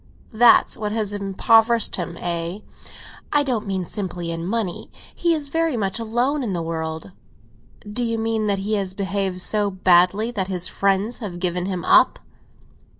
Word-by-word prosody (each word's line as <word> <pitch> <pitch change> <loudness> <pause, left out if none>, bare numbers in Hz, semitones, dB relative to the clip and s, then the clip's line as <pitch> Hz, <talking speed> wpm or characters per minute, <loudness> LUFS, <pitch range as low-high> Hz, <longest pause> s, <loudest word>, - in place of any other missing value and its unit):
"That's 235 +2 +5
what 210 -1 -3
has 215 -2 -1
impoverished 225 +3 +3
him, 170 -2 -5
eh?" 170 +3 -3 0.7
"I 295 0 +4
don't 235 -6 -2
mean 190 -2 -2
simply 175 -3 -4
in 165 +1 -4
money. 205 -4 -3 0.2
He 340 -1 +1
is 290 -2 -2
very 325 -3 0
much 195 0 -1
alone 240 +6 0
in 225 -7 -2
the 170 -2 -2
world." 160 - -5 0.8
"Do 210 +4 -3
you 230 -1 -1
mean 225 -1 -1
that 200 -1 +1
he 200 +3 -3
has 190 -2 -4
behaved 195 -2 -2
so 210 +1 +1
badly 185 +4 +3
that 195 -5 -2
his 180 -2 -2
friends 200 +4 0
have 200 -7 -6
given 180 0 -1
him 185 -3 -4
up?" - - +5
200 Hz, 165 wpm, -22 LUFS, 180-225 Hz, 0.8 s, That's